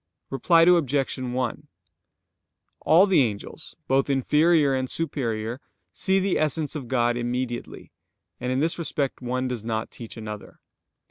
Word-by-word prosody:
Reply 165 +5 +4
Obj. 145 -6 +3
1: 125 -1 -3 1.1
All 170 +5 +5
the 190 -7 +4
angels, 105 -5 -4
both 135 +1 +2
inferior 150 +2 +3
and 130 -1 -1
superior, 120 -6 -3 0.3
see 190 0 +1
the 195 0 0
Essence 155 -1 -1
of 135 -5 -5
God 120 -1 +1
immediately, 120 0 -4 0.5
and 125 +1 -2
in 130 +2 0
this 165 +3 0
respect 145 -5 -2
one 130 +1 -2
does 125 -4 -4
not 110 -1 -3
teach 115 0 -10
another. 105 -2 -8
130 Hz, 135 wpm, -25 LUFS, 120-155 Hz, 1.1 s, All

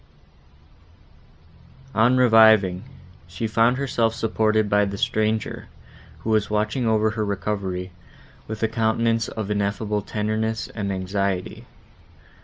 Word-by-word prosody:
On 120 +3 +3
reviving, 110 -6 +5 0.4
she 90 +6 -5
found 115 +3 +2
herself 120 -5 0
supported 110 -1 +1
by 105 0 +3
the 100 0 -3
stranger, 110 +1 -1 0.5
who 110 - -3
was 110 -1 +1
watching 105 +3 -1
over 110 -1 +2
her 110 0 -2
recovery, 95 -2 -3 0.6
with 110 0 -5
a - - +4
countenance 115 +1 0
of 105 -2 -5
ineffable 105 +1 -1
tenderness 110 +1 -2
and 100 -3 -4
anxiety. 95 0 -3
110 Hz, 110 wpm, -23 LUFS, 100-110 Hz, 0.6 s, reviving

